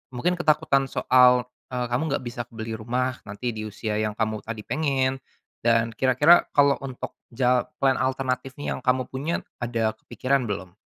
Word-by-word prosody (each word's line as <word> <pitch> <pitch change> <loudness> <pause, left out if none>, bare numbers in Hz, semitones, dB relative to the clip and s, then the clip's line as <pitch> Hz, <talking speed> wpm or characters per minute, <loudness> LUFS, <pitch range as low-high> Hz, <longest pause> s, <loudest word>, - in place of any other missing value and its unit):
mungkin 180 +8 0
ketakutan 150 -4 +2
soal, 125 -1 +5 0.2
eee, 125 -1 -2
kamu 145 +4 0
nggak - - -4
bisa 120 0 -4
beli 110 -1 -7
rumah 125 +3 -1
nanti 105 +5 -3
di 110 -1 -5
usia 105 0 -3
yang 105 -1 -1
kamu 110 -1 -1
tadi 110 -1 -7
pengen 135 -3 0 0.4
dan 115 -1 +2
kira-kira 135 +8 +5
kalau 140 -1 +5
untuk 130 -2 -6 0.2
jal 125 +1 +2 0.2
plan 135 -1 +3
alternatif 130 0 -1
nih - - -2
yang - - -8
kamu 125 0 +1
punya 145 +6 -2 0.2
ada 115 -2 0
kepikiran 130 +4 -1
belum? 95 -4 -5
125 Hz, 165 wpm, -25 LUFS, 115-135 Hz, 0.4 s, soal